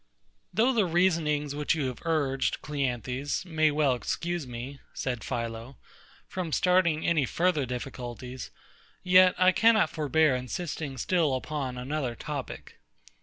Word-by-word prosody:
Though 245 +4 +3
the 215 -6 +2
reasonings 160 -5 +1
which 150 +3 0
you 150 -4 -1
have 125 -2 -4
urged, 145 -5 0
CLEANTHES, 135 +1 -2
may 160 -3 +2
well 145 -3 +2
excuse 170 +6 -3
me, 125 +3 -7 0.2
said 125 -4 -3
PHILO, 115 +2 -5 0.5
from 180 -4 -4
starting 170 -2 +2
any 160 -4 +3
further 165 -4 +1
difficulties, 125 0 -6 0.5
yet 185 0 +6
I 185 0 +5
cannot 220 -4 +4
forbear 155 -2 +2
insisting 140 +1 -4
still 155 0 +1
upon 130 -1 -4
another 130 -1 -3
topic. 145 -1 -7
150 Hz, 125 wpm, -28 LUFS, 130-170 Hz, 0.5 s, yet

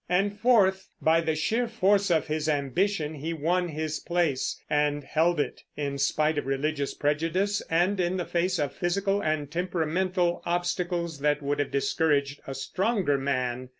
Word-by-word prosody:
And 200 +3 +1
fourth, 195 -5 +3
by 165 +1 +3
the 160 -1 0
sheer 225 +10 0
force 200 -3 +2
of 165 -2 +2
his 155 0 -2
ambition 150 +3 0
he 155 +3 -4
won 175 +3 0
his 155 -1 -3
place, 170 -6 -1
and 145 0 +1
held 160 +3 +1
it, - - -2 0.2
in 140 -1 -3
spite 150 +2 +1
of 135 - -6
religious 140 +1 -1
prejudice, 165 +8 0
and 180 +4 +2
in 180 +1 +1
the 175 - -2
face 180 +1 0
of 145 -3 -1
physical 195 +3 0
and 155 -3 -1
temperamental 175 +1 0
obstacles 175 -2 -1
that 150 0 +1
would 145 +1 -1
have 145 - 0
discouraged 140 0 +1
a 135 - -5
stronger 185 - 0
man. 130 -2 -2
160 Hz, 160 wpm, -27 LUFS, 145-185 Hz, 0.2 s, fourth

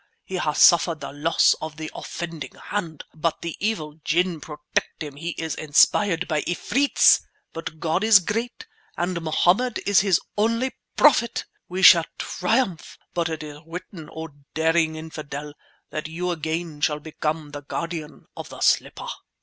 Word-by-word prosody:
He 190 - -4
has 150 -4 -1
suffered 170 -1 +6
the - - -6
loss 155 +3 +3
of 155 -1 -6
the 155 -1 -6
offending 165 -3 -6
hand, 170 -7 -5
but 160 +1 -2
the 170 -1 -4
evil 160 -8 -2
ginn 170 -1 +1
protect 150 +1 -4
him; 145 -2 -8
he 165 +3 -5
is 160 -1 -3
inspired 165 +4 +3
by 155 -2 0
efreets! 270 - +3 0.3
But 165 -1 -7
God 165 +5 0
is 220 -1 +8
great 230 - -3 0.3
and 175 -1 -1
Mohammed 180 +9 +2
is 200 -1 +5
His 195 -4 +3 0.2
only 230 +5 +1 0.3
Prophet! 245 -5 +4 0.2
We 185 +2 -3
shall 170 -2 +9
triumph; 190 -3 -1 0.2
but 170 -2 0
it 160 -1 -4
is 150 -1 -9
written, 170 -1 -8
oh, 160 0 -6 0.3
daring 160 0 +2
infidel, 150 -2 -7 0.4
that 155 0 -4
you 175 +3 -3
again 160 -1 -3
shall 150 0 +1
become 155 0 -4
the 145 0 -7
guardian 165 +1 -5
of - - -8
the - - -10
slipper!" - - +2
165 Hz, 155 wpm, -24 LUFS, 155-185 Hz, 0.4 s, shall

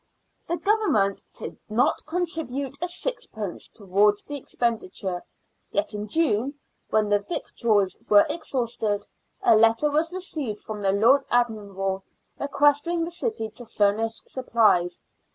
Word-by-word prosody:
The 340 - 0
Government 390 - +2 0.2
did - - -7
not 220 +4 +2
contribute 310 -6 -2
a 355 - 0
sixpence 350 - -4
towards 205 0 +2
the 290 - -6
expenditure, 210 -8 -2 0.5
yet 305 - 0
in 210 0 -4
June, 280 -1 +1 0.3
when 215 -1 +2
the 205 0 +4
victuals 205 - 0
were 205 -1 +7
exhausted, 230 -9 -2 0.4
a 365 - +6
letter 225 +6 +4
was 315 +3 +1
received 305 - -3
from 215 -1 -7
the 195 -1 +2
Lord 235 +8 +5
Admiral, 200 -5 0 0.4
requesting 290 +4 +2
the 340 - -6
city 345 - -3
to 240 +1 -8
furnish 220 +1 +1
supplies. 215 -9 +2
230 Hz, 125 wpm, -25 LUFS, 205-300 Hz, 0.5 s, were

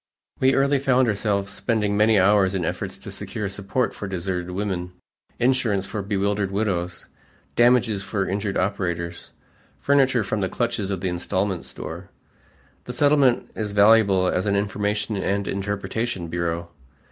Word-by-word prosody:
We 130 +1 +4
early 140 +1 +3
found 130 -2 +3
ourselves 100 -2 0
spending 105 -3 0
many 105 +1 +4
hours 95 0 +4
in 90 -3 -1
efforts - - -4
to - - -8
secure 105 - -4
support 100 +6 -1
for 105 - -6
deserted 90 -1 -3
women, 90 -2 -3 0.4
insurance 120 -6 +1
for 105 +1 -4
bewildered 100 0 0
widows, 95 -3 -2 0.5
damages 120 -4 +4
for 95 0 -2
injured 100 +1 -2
operators, 85 -3 -2 0.5
furniture 135 -4 +3
from 105 +1 -2
the 95 - 0
clutches 115 -5 -2
of 95 -3 -3
the 95 - -1
installment 90 -1 -2
store. 80 +7 -8 0.8
The 125 - -5
Settlement 140 -1 +3
is 105 -2 -3
valuable 100 -2 +5
as 90 +2 0
an 100 - +2
information 105 +1 -1
and 100 +1 -1
interpretation 100 -1 -3
bureau. 85 0 -2
100 Hz, 145 wpm, -23 LUFS, 95-110 Hz, 0.8 s, valuable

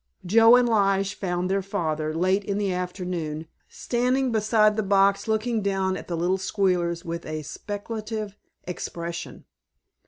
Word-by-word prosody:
Joe 225 +5 +7
and 250 -1 +4
Lige 195 -3 +2
found 180 -1 -2
their 195 +1 +1
father, 155 -5 -2
late 185 +5 +1
in 200 0 -2
the 200 -2 0
afternoon, 180 -4 -4 0.2
standing 250 +2 0
beside 215 -1 +3
the 220 - +1
box 200 0 +3
looking 220 +1 0
down 195 -1 0
at - - -8
the 170 - -3
little 180 +3 +1
squealers 180 -3 0
with 170 0 -4
a 155 0 -5
speculative 210 +5 -5 0.3
expression. 170 -1 -6
195 Hz, 145 wpm, -25 LUFS, 175-215 Hz, 0.3 s, Joe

